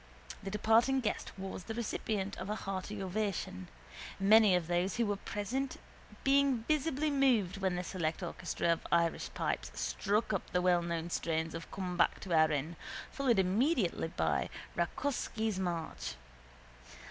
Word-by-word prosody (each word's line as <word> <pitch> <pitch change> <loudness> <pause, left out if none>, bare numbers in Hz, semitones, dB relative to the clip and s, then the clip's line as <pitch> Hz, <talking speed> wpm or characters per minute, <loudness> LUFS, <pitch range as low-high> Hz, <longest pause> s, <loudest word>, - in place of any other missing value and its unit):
The 195 - -5
departing 225 +6 +3
guest 215 - -2
was 190 -1 -6
the 225 - -4
recipient 210 -3 -2
of 195 - -5
a 210 - 0
hearty 195 0 -4
ovation, 185 - -2 0.5
many 205 0 +7
of 180 -2 +1
those 175 +3 0
who 235 - +2
were 205 -1 0
present 245 +7 -3 0.5
being 275 -4 +3
visibly 305 -1 +1
moved 240 -9 +3
when 190 -2 0
the 180 - -2
select 170 -1 -2
orchestra 170 0 -2
of 165 - -6
Irish 170 -1 +2
pipes - - -2
struck 210 +2 0
up 195 - -2
the 180 - +3
wellknown 170 -2 +1
strains 160 -1 -1
of 165 0 -6
Come 180 -2 -4
Back - - +3
to 185 - -3
Erin, 155 0 +2 0.3
followed 260 -5 +2
immediately 195 - +2
by 80 - 0 0.3
Rakóczsy's 220 +1 -1
March. 165 - -3
195 Hz, 145 wpm, -33 LUFS, 170-225 Hz, 0.5 s, many